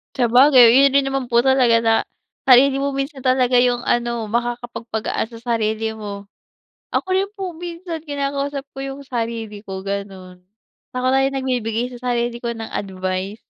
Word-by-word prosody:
Sabagay 250 Hz, 0 st, +6 dB
yun 275 Hz, 0 st, +6 dB
din 275 Hz, 0 st, +2 dB
naman 270 Hz, -2 st, -3 dB
po 235 Hz, -, +5 dB
talaga 250 Hz, -3 st, +4 dB
na, 225 Hz, -1 st, +2 dB, 0.5 s
sarili 265 Hz, +1 st, +6 dB
mo 280 Hz, -, 0 dB
minsan 275 Hz, 0 st, -4 dB
talaga 255 Hz, -1 st, +2 dB
yung 245 Hz, -1 st, +1 dB
ano, 235 Hz, -2 st, 0 dB
makakapag-pagaan 235 Hz, -1 st, -3 dB
sa 230 Hz, -, -10 dB, 0.2 s
sarili 220 Hz, 0 st, -1 dB
mo. 200 Hz, -2 st, -7 dB, 0.6 s
Ako -, -, -1 dB
rin 390 Hz, +1 st, 0 dB
po 380 Hz, -3 st, -4 dB
minsan 335 Hz, -1 st, -7 dB
kinakausap 280 Hz, -1 st, -3 dB
ko -, -, -7 dB
yung 275 Hz, +1 st, -6 dB
sarili 225 Hz, -3 st, -4 dB
ko 190 Hz, -1 st, -6 dB
ganun. 190 Hz, -2 st, -6 dB, 0.5 s
Para 255 Hz, +1 st, 0 dB
lang 270 Hz, -, +1 dB
nag-bibigay 245 Hz, -2 st, -2 dB
sa 245 Hz, 0 st, -3 dB
sarili 240 Hz, 0 st, -1 dB
ko 235 Hz, -, -1 dB
ng 225 Hz, -1 st, -6 dB
advice. 190 Hz, +2 st, -4 dB
240 Hz, 155 wpm, -20 LUFS, 220-270 Hz, 0.6 s, Sabagay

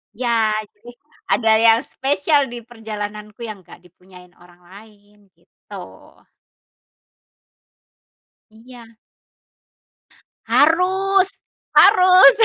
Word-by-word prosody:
ya 230 Hz, -2 st, 0 dB
jadi 210 Hz, +3 st, -17 dB, 0.4 s
ada 225 Hz, -2 st, +1 dB
yang 225 Hz, 0 st, +4 dB
spesial 285 Hz, +1 st, -1 dB
di 240 Hz, -1 st, -10 dB
perjalananku 215 Hz, -1 st, -9 dB
yang 215 Hz, -3 st, -8 dB
nggak 175 Hz, -, -16 dB
dipunyai 180 Hz, 0 st, -19 dB
orang 175 Hz, 0 st, -22 dB
lain, 205 Hz, +2 st, -19 dB
gitu. -, -, -18 dB, 2.8 s
Iya. 230 Hz, +1 st, -17 dB, 1.5 s
Harus 375 Hz, +5 st, +2 dB, 0.5 s
harus. 370 Hz, +2 st, +6 dB
225 Hz, 75 wpm, -19 LUFS, 205-275 Hz, 2.8 s, harus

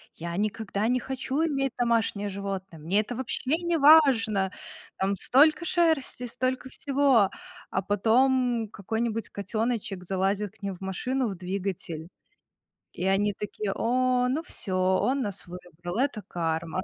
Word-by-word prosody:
"Я 170 Hz, +1 st, -5 dB
никогда 215 Hz, 0 st, -1 dB
не 250 Hz, +1 st, +2 dB
хочу 265 Hz, +4 st, -2 dB
иметь 275 Hz, -4 st, -1 dB
домашнее 225 Hz, -4 st, +1 dB
животное!" 195 Hz, -3 st, -5 dB
"Мне 180 Hz, +7 st, +1 dB
это 235 Hz, +3 st, -6 dB
вообще 260 Hz, +3 st, -1 dB
не 340 Hz, -1 st, +1 dB
важно!" 245 Hz, -11 st, +5 dB, 0.5 s
"Там 195 Hz, +1 st, 0 dB
столько 305 Hz, -, +4 dB
шерсти, 320 Hz, -8 st, +1 dB
столько 255 Hz, +2 st, -2 dB
всего". 270 Hz, -8 st, +3 dB, 0.4 s
А 190 Hz, -, -1 dB
потом 235 Hz, +3 st, +2 dB
какой-нибудь 225 Hz, +2 st, -2 dB
котеночек 215 Hz, -2 st, -2 dB
залазит 195 Hz, +2 st, -1 dB
к -, -, -37 dB
ним 195 Hz, -1 st, -2 dB
в 180 Hz, -, -14 dB
машину, 250 Hz, +7 st, -1 dB
в 195 Hz, -, -5 dB
двигатель. 180 Hz, -3 st, -4 dB, 0.9 s
И 180 Hz, -, -5 dB
они 205 Hz, +2 st, +2 dB
такие: 210 Hz, -1 st, -4 dB
"О, 250 Hz, +1 st, +2 dB
ну 300 Hz, +6 st, 0 dB
всё, 185 Hz, -, -4 dB
он 190 Hz, +9 st, +2 dB
нас 200 Hz, -4 st, -5 dB
выбрал". 175 Hz, +2 st, -7 dB
Это 260 Hz, -6 st, 0 dB
карма. 165 Hz, +1 st, -2 dB
215 Hz, 140 wpm, -27 LUFS, 190-255 Hz, 0.9 s, важно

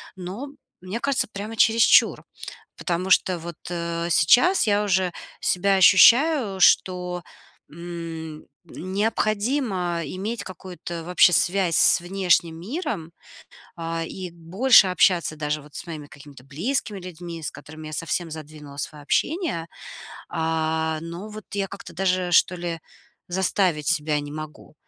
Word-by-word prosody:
Но, 190 Hz, +9 st, -7 dB, 0.3 s
мне 190 Hz, +6 st, -5 dB
кажется, 280 Hz, -4 st, +1 dB
прямо 210 Hz, +3 st, -6 dB
чересчур, 225 Hz, +1 st, +4 dB, 0.5 s
потому 180 Hz, +1 st, -2 dB
что 185 Hz, -1 st, +3 dB
вот, 170 Hz, 0 st, -8 dB
э, 170 Hz, -1 st, -3 dB
сейчас 250 Hz, -, +4 dB
я 205 Hz, 0 st, +2 dB
уже 185 Hz, -2 st, +1 dB, 0.3 s
себя 195 Hz, +2 st, +2 dB
ощущаю, 220 Hz, -, +5 dB
что, 180 Hz, -1 st, +2 dB, 0.5 s
м, 165 Hz, -1 st, -8 dB, 0.2 s
необходимо 205 Hz, -, -1 dB
иметь 200 Hz, +3 st, -4 dB
какую-то 175 Hz, -2 st, -8 dB
вообще 180 Hz, 0 st, +4 dB
связь 180 Hz, -2 st, +2 dB
с 170 Hz, -, +5 dB
внешним 175 Hz, -3 st, +1 dB
миром, 195 Hz, -, -5 dB, 0.7 s
а. 165 Hz, 0 st, -3 dB
И 180 Hz, 0 st, -7 dB
больше 190 Hz, +7 st, +4 dB
общаться 180 Hz, -3 st, +2 dB
даже 150 Hz, 0 st, -2 dB
вот 150 Hz, 0 st, -17 dB
с -, -, -6 dB
моими 150 Hz, -3 st, -7 dB
какими-то 140 Hz, -3 st, -14 dB
близкими 205 Hz, -, -3 dB
людьми, 170 Hz, -2 st, -8 dB
с -, -, -4 dB
которыми 155 Hz, +1 st, -11 dB
я 155 Hz, -, -8 dB
совсем 165 Hz, +1 st, -3 dB
задвинула 150 Hz, -2 st, -10 dB
свое 150 Hz, 0 st, -6 dB
общение. 300 Hz, -, -1 dB, 0.6 s
А, 160 Hz, 0 st, -1 dB
но 170 Hz, +5 st, -7 dB
вот 215 Hz, -1 st, -9 dB
я 195 Hz, -1 st, -1 dB
как-то 200 Hz, -3 st, -10 dB
даже, 180 Hz, 0 st, 0 dB
что 180 Hz, +1 st, +4 dB
ли, 170 Hz, -2 st, -5 dB, 0.5 s
заставить 180 Hz, -4 st, 0 dB
себя 150 Hz, 0 st, +1 dB
не 145 Hz, 0 st, -8 dB
могу. 155 Hz, 0 st, -9 dB
175 Hz, 130 wpm, -23 LUFS, 160-195 Hz, 0.7 s, ощущаю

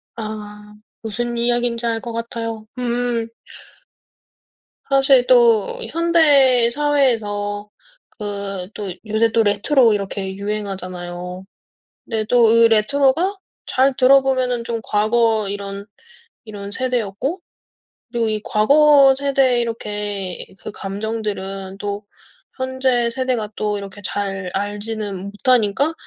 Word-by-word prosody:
아 210 Hz, -1 st, -8 dB, 0.3 s
무슨 235 Hz, +2 st, -3 dB
이야긴지 240 Hz, 0 st, 0 dB
알 230 Hz, -1 st, 0 dB
것 235 Hz, -, -6 dB
같아요. 230 Hz, -1 st, -4 dB
음. 240 Hz, -1 st, -1 dB, 1.6 s
사실 270 Hz, -2 st, +4 dB
또 235 Hz, -4 st, +4 dB
현대 290 Hz, -8 st, +4 dB
사회에서 225 Hz, -8 st, 0 dB, 0.5 s
그 200 Hz, -3 st, -4 dB
또 200 Hz, -3 st, -5 dB
요새 220 Hz, +1 st, +2 dB
또 225 Hz, -, +3 dB
레트로 220 Hz, +4 st, +3 dB
이렇게 195 Hz, -1 st, -3 dB
유행하잖아요. 185 Hz, -3 st, -5 dB, 0.6 s
네 220 Hz, -2 st, -2 dB
또 240 Hz, +1 st, +4 dB
그 230 Hz, +1 st, +6 dB
레트로가 275 Hz, -, +2 dB, 0.3 s
잘 265 Hz, +1 st, +2 dB
들어 275 Hz, +1 st, +6 dB
보면은 255 Hz, -3 st, 0 dB
좀 230 Hz, -1 st, -3 dB
과거 220 Hz, 0 st, +1 dB
이런 200 Hz, 0 st, -6 dB, 0.6 s
이런 205 Hz, -3 st, -8 dB
세대였고 250 Hz, -, -1 dB, 0.7 s
그리고 235 Hz, -2 st, 0 dB
이 215 Hz, -1 st, -1 dB
과거 280 Hz, +4 st, +5 dB
세대 270 Hz, -3 st, +2 dB
이렇게 205 Hz, -5 st, -4 dB, 0.2 s
그 -, -, -7 dB
감정들은 195 Hz, -2 st, -5 dB
또 205 Hz, +1 st, -4 dB, 0.5 s
현재 260 Hz, -2 st, 0 dB
세대가 245 Hz, -3 st, -2 dB
또 210 Hz, -1 st, -1 dB
이렇게 200 Hz, 0 st, -9 dB
잘 195 Hz, -1 st, -3 dB
알지는 205 Hz, -1 st, -4 dB
못하니까 245 Hz, +6 st, +1 dB
225 Hz, 225 characters per minute, -20 LUFS, 205-250 Hz, 1.6 s, 그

